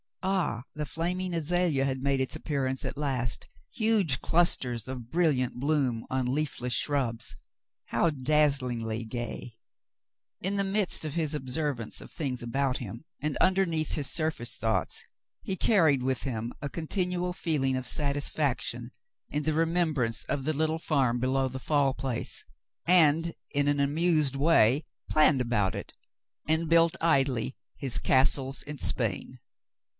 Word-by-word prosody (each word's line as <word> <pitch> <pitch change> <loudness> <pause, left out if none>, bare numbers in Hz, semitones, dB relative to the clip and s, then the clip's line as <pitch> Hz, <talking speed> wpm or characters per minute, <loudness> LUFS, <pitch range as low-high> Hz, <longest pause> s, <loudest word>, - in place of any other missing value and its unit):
Ah, 185 -11 0
the 150 0 -3
flaming 180 +4 -3
azalea 165 -3 +1
had 130 -1 -2
made 140 0 +1
its 130 - -1
appearance 135 -4 -2
at - - -4
last, 130 -6 -1 0.2
huge 210 - +2
clusters 125 -9 +1
of 125 -3 -7
brilliant 145 -8 +1
bloom 135 -5 0
on 130 -1 0
leafless 125 -2 -1
shrubs. 120 - 0 0.5
How 170 - +1
daz 150 +1 +3
zlingly 115 -3 -3
gay! 120 0 -5 0.8
In 195 +2 0
the 200 - +2
midst 195 -4 0
of 150 - -4
his 160 -2 -1
observance 130 -3 -3
of - - -11
things 135 -5 -3
about 130 +2 0
him, 115 +4 -8 0.2
and 150 -1 -1
underneath 175 -5 +2
his 145 -3 +1
surface 150 -5 0
thoughts, 110 -1 -1 0.4
he 190 - -2
carried 165 - +3
with 130 0 -1
him 120 -3 -3
a 140 - -3
continual 180 +2 -2
feeling 150 -7 0
of 130 -2 -3
satisfaction 145 +4 -1 0.4
in 150 +1 -2
the 155 - +1
remembrance 155 -8 +1
of 140 -3 -2
the 155 - +1
little 160 +2 0
farm 135 -7 +1
below 130 +1 +1
the 130 +1 -6
Fall 140 -1 +2
Place, 130 -3 -3 0.4
and 165 -1 +5 0.2
in 145 0 +2
an 145 0 +2
amused 150 0 +2
way 140 -2 +4 0.3
planned 150 -3 +4
about 110 -6 0
it, - - -7 0.5
and 160 +1 +1
built 165 0 +5
idly 135 -6 +1 0.2
his 135 -4 +1
"Castles 135 +1 +2
in 150 0 -7
Spain." 120 +2 -1
140 Hz, 145 wpm, -28 LUFS, 130-160 Hz, 0.8 s, and